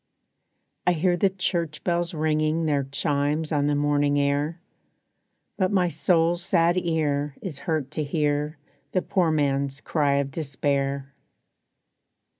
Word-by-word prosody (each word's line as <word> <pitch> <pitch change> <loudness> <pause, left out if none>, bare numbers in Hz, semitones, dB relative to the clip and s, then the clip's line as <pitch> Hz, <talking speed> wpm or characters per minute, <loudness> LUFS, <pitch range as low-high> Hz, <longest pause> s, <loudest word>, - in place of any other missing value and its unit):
I 180 - +5
hear 175 +2 +2
the 195 +3 +3
church 170 -5 -2
bells 175 -1 -1
ringing 155 +1 +1
Their 145 -3 +1
chimes 145 +2 -1
on 145 -2 +1
the 145 - +2
morning 145 0 +2
air; 145 +4 0 1.0
But 185 -1 +1
my 185 -3 +2
soul's 170 +2 +2
sad 170 -1 +3
ear 150 -5 0
is 155 -8 -6
hurt 155 -4 -1
to 155 - -2
hear 150 0 -1 0.4
The 185 - +1
poor 180 -4 +1
man's 140 -2 0
cry 145 -2 +1
of 140 -1 0
despair. 140 -2 -2
150 Hz, 130 wpm, -25 LUFS, 145-170 Hz, 1.0 s, I